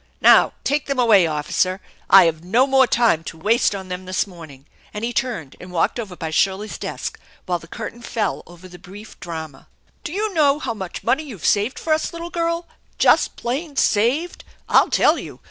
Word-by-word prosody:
Now, - - +6
take 290 0 -1
them 275 -1 -2
away, 215 -8 +5
officer. 160 +5 -1 0.3
I've 165 -4 +6
no 225 +9 +3
more 265 -1 +4
time 230 -11 +2
to 165 - -7
waste 215 +5 +2
on 190 -1 -7
them 180 +1 -6
this 185 0 -1
morning! 160 -8 -13
" - - -30
and 210 +2 -3
he 240 - -3
turned 235 - -3
and 180 0 -10
walked 175 +7 0
over 200 -6 -6
by 160 -2 -5
Shirley's 195 +5 0
desk, - - -5 0.3
while 175 -1 -1
the 165 - -14
curtain 235 +7 -7
fell 235 -2 -2
over 175 +1 -13
the 180 -1 -13
brief 205 +4 -13
drama. 160 -4 -8 0.4
"Do - - -5
jou 420 +1 -2
know 290 -4 +3
how 265 -6 -3
much 190 -5 -7
money 275 - +1
you've 250 - -9
saved 210 +5 +1
for 315 - 0
us, 315 - -1
little 335 +1 -7
girl, 335 0 -1 0.3
just - - +3
plain 280 +5 -4
saved? 265 +9 +1 0.2
I'll - - +4
tell - - +3
you. - - -10
210 Hz, 195 wpm, -21 LUFS, 180-270 Hz, 0.4 s, Now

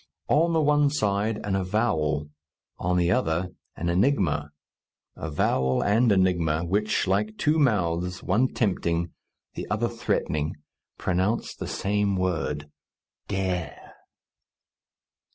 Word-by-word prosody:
On 165 +3 +4
the 165 -1 +2
one 150 -1 +4
side 105 -5 0
an 100 -2 -1
avowal; 80 -7 0 0.5
on 90 +1 +1
the 85 0 +2
other 80 +2 +1 0.3
an 85 - -3
enigma 85 - +1 0.7
avowal 65 -4 0
and 110 +3 +3
enigma, 85 -5 +2
which, 105 +4 +1
like 105 +3 0
two 155 +2 +2
mouths, 90 - +1
one 115 +8 +2
tempting, 85 -5 0 0.4
the - - -6
other 110 +3 +1
threatening, 80 -10 -1 0.4
pronounce 95 +5 0
the - - -6
same 100 0 0
word, 85 -5 -1 0.6
Dare! 90 -5 -3
95 Hz, 110 wpm, -26 LUFS, 85-110 Hz, 0.7 s, On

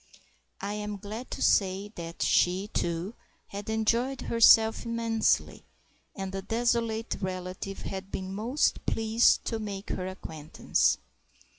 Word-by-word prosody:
I 200 +1 -3
am 210 0 -4
glad 215 +5 -7
to - - -3
say 195 +1 +2
that 170 -2 -5
she, 185 +3 +2
too, 170 +3 -2 0.4
had 200 +2 -6
enjoyed 230 +4 +1
herself 225 -1 +5
immensely, 230 -1 0 0.5
and 195 -2 -4
the 195 0 -4
desolate 230 +1 0
relative 185 +1 -5
had 190 0 -5
been 190 0 -4
most 235 +8 0
pleased 225 +1 +3
to 225 - -2
make 200 -2 -5
her 185 - -3
acquaintance. 160 -5 0
205 Hz, 125 wpm, -28 LUFS, 190-225 Hz, 0.5 s, herself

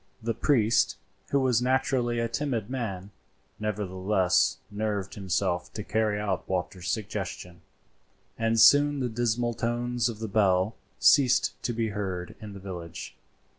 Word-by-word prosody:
The 115 +1 -2
priest, 115 -3 +2 0.3
who 140 - +2
was 125 -3 +2
naturally 125 -1 +1
a 115 0 0
timid 120 -3 -2
man, 100 -7 -4 0.5
nevertheless 95 -3 +1
nerved 105 -2 -2
himself 90 -2 -1
to 105 - -5
carry 105 0 0
out 100 -4 -2
Walter's 90 0 -3
suggestions, 90 -4 -4 0.7
and 115 0 +1
soon 145 +4 +6
the 125 -2 -1
dismal 120 +1 0
tones 120 +1 -1
of 115 - -6
the 110 +1 -4
bell 100 -1 +2 0.2
ceased 130 -3 +4
to - - -1
be 115 -1 -1
heard 95 -3 -4
in 105 -2 -8
the 100 - -9
village. 90 -4 -7
110 Hz, 135 wpm, -27 LUFS, 95-120 Hz, 0.7 s, soon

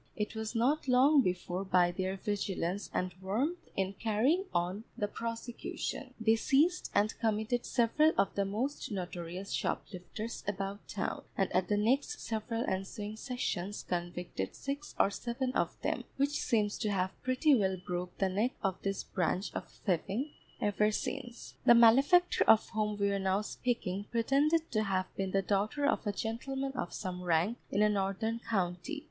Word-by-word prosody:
It 210 0 -2
was 220 +1 -4
not 265 +6 +2
long 270 +3 +6
before 180 -2 -1
by 180 -2 +3
their 185 +1 -2
vigilance 195 -2 -2
and 180 0 -1
warmth 255 - 0 0.2
in 190 0 0
carrying 235 - +1
on 180 +5 -1
the 205 - 0
prosecution, 235 +3 -5
they 225 0 +4
seized 305 +10 +2
and 210 +2 +3
committed 220 +2 0
several 280 +7 +4
of 195 - +2
the 200 - +1
most 225 +9 -2
notorious 180 0 -5
shoplifters 210 +5 -4
about 195 0 -3
town, 195 - -3
and 195 - +1
at 185 0 +3
the 205 - +2
next 240 +7 +1
several 225 +1 -2
ensuing 205 +3 -3
sessions 220 -5 -3
convicted 175 - -3
six 280 +2 -5
or 200 - +4
seven 245 +4 -2
of - - -1
them, - - 0
which 280 +1 +2
seems 210 -4 +1
to 215 - 0
have 190 -2 -1
pretty 255 +4 +3
well 190 -6 +2
broke 180 0 -4
the 195 - +2
neck 210 +7 0
of 190 -2 -1
this 195 -1 -2
branch 185 +2 -1
of - - -5 0.2
thieving 200 - 0 0.3
ever 210 +1 +2
since. 240 +2 -4
The 240 - +9
malefactor 275 +10 +6
of 220 0 +6
whom 210 -1 -1
we 200 0 +2
are 200 - 0
now 190 +1 +1
speaking 205 -4 -2
pretended 285 +8 +2
to 215 - +2
have 190 -3 -1
been 195 -1 -1
the 195 +1 +1
daughter 210 +9 0
of 285 - +1
a - - +2
gentleman 265 +6 -3
of 250 -9 -4
some 180 -1 -4
rank 175 +6 +1
in 205 +2 +2
a - - +6
northern 205 +3 0
county. 190 - -2
210 Hz, 165 wpm, -32 LUFS, 190-245 Hz, 0.3 s, The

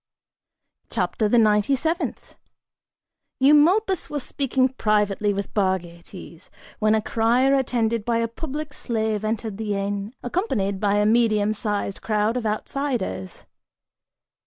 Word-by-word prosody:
CHAPTER 215 -2 -1
THE 240 - +4
NINETY 210 +3 +3
SEVENTH. 325 +6 -3 1.1
Eumolpus 330 +8 +4
was 290 -3 -3
speaking 265 -1 0
privately 210 -4 +1
with 200 0 -4
Bargates, 180 -2 -4 0.3
when 215 0 +3
a 215 - 0
crier 240 +5 +2
attended 235 -4 0
by 235 +1 0
a 230 0 0
public 295 +4 -6
slave 220 -4 -2
entered 215 -1 -3
the 210 -2 -2
inn, 200 +3 -3
accompanied 215 - -1
by 205 0 +1
a 210 0 +2
medium 215 -2 +3
sized 205 -2 -3
crowd 215 +1 0
of 240 -3 -1
outsiders. 215 - -3
220 Hz, 120 wpm, -23 LUFS, 205-255 Hz, 1.1 s, THE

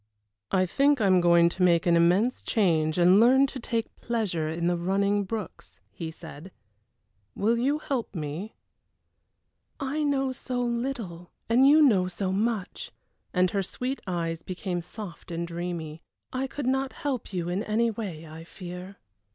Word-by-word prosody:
"I 185 -1 +2
think 280 +9 +3
I 215 - +2
am 185 -2 +5
going 170 -1 +5
to 185 - -7
make 170 -2 +4
an 170 -1 +4
immense 180 +9 +3
change 160 -7 +1
and 180 +3 +6
learn 260 +4 +6
to 270 -1 -6
take 230 -2 -3
pleasure 200 -10 -1
in 165 +2 -2
the 175 0 +2
running 200 +3 +1
brooks," 215 0 -7
he 165 -2 -6
said. 160 +2 -11 0.8
"Will 225 +3 +2
you 280 +5 +2
help 270 -8 -3
me?" 160 +7 -5 1.2
"I 275 +3 -2
know 275 -3 +1
so 250 -1 -4
little, 235 -8 -3 0.2
and 250 +4 +5
you 305 +1 +7
know 200 -10 +4
so 185 +1 -3
much," 210 -1 -2 0.4
and 180 -1 +2
her 200 - 0
sweet 250 +8 -4
eyes 165 -2 -2
became 180 -1 -4
soft 185 +1 -9
and 170 0 -3
dreamy. 170 -2 -5 0.3
"I 260 +1 -1
could 285 0 -5
not 265 +1 0
help 270 -7 -4
you 175 -3 -2
in 180 +3 -1
any 225 +2 +1
way, 190 -8 -6
I 160 +1 -10
fear." 180 +2 -9
195 Hz, 160 wpm, -27 LUFS, 175-240 Hz, 1.2 s, you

